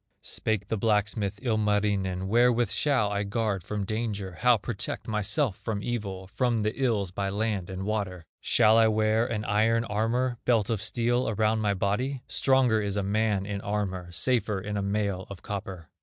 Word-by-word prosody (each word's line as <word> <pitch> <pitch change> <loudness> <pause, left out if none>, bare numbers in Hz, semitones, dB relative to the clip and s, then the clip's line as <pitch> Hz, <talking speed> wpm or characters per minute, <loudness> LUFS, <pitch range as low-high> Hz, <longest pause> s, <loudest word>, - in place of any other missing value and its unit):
Spake 105 -2 -2
the 110 - -1
blacksmith, 105 -1 0
Ilmarinen: 105 -5 0
"Wherewith 120 0 +3
shall 130 -9 +1
I 100 0 0
guard 100 -2 -1
from 105 +1 -3
danger, 105 -4 -3
How 125 -1 +5
protect 105 0 -4
myself 110 - +1
from 105 -3 -4
evil, 100 -6 -3
From 115 +2 0
the 105 +1 0
ills 110 -9 0
by 100 +1 -2
land 100 -2 -2
and 95 0 -5
water? 100 -5 -3
Shall 110 -1 +4
I 115 - +6
wear 110 +1 +2
an 105 -2 -3
iron 110 +3 +2
armor, 115 +4 0
Belt 115 -3 +2
of 110 -3 -1
steel 120 +3 0
around 110 +1 +1
my 105 -2 +1
body? 120 +8 -1
Stronger 130 -5 +3
is 100 -1 -2
a 100 - 0
man 105 -1 +1
in 100 -1 -4
armor, 95 -4 -3
Safer 105 +2 0
in 105 +2 -5
a 100 - 0
mail 100 -1 -1
of 100 -2 -9
copper." 95 -5 -6
105 Hz, 170 wpm, -27 LUFS, 100-115 Hz, -, I